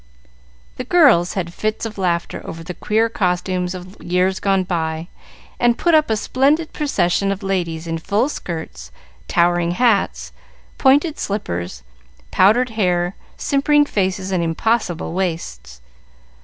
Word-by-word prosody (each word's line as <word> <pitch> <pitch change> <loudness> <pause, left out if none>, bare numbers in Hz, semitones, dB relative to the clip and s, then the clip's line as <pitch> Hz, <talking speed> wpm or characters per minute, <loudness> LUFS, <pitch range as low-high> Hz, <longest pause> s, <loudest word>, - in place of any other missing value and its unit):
The - - -3
girls 250 - +4
had 170 -3 -3
fits 215 +3 -2
of 215 -3 -6
laughter 170 -2 -1
over 165 0 -8
the 180 +2 -6
queer 220 +6 +1
costumes 180 -3 -1
of 185 +2 -11
years 180 +2 0
gone 195 -1 +1
by, 165 -2 -3 0.5
and 240 -1 +3
put 345 - +2
up 310 -4 +4
a 220 - +1
splendid 285 +8 +1
procession 195 -9 0
of 195 +1 -4
ladies 170 -4 -2
in 165 0 -3
full 205 +9 +1
skirts, 160 - -6 0.4
towering 175 0 +2
hats, 175 - +1 0.5
pointed 290 +4 +3
slippers, 90 - -4 0.5
powdered 235 +7 +4
hair, 180 -3 0 0.2
simpering 290 +1 +2
faces, 190 -5 -1
and 180 -2 +1
impossible 175 0 -1
waists. 115 - -4
185 Hz, 130 wpm, -20 LUFS, 170-225 Hz, 0.5 s, girls